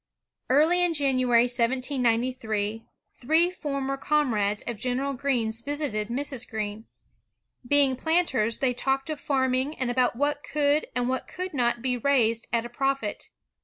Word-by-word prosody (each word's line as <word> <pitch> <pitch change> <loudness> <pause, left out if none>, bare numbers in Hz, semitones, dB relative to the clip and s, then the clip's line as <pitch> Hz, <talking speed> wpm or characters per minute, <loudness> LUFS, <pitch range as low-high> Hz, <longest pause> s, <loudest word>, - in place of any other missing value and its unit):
Early 315 +7 +4
in 350 -1 +2
January, 255 -4 +3
1793, 240 -3 -1 0.3
three 320 +7 +2
former 275 -5 -3
com 295 -2 +1
rades 205 0 -1
of 235 -2 -4
General 255 +5 -2
Greene's 240 -4 -1
visited 280 -6 -2
Mrs. 260 +1 -2
Greene. 215 -1 -5 0.8
Being 280 -1 +5
planters, 265 -7 +1
they 260 -2 +1
talked 270 +4 -1
of 305 - -5
farming 265 +1 0
and 255 -2 -1
about 250 -1 +1
what 290 +3 -1
could 295 0 +1
and 245 -1 0
what 260 0 -2
could 365 -1 -6
not 240 -3 0
be 250 -1 0
raised 230 -3 +1
at 230 0 0
a - - -4
profit. 270 -3 -2
255 Hz, 145 wpm, -26 LUFS, 235-285 Hz, 0.8 s, Being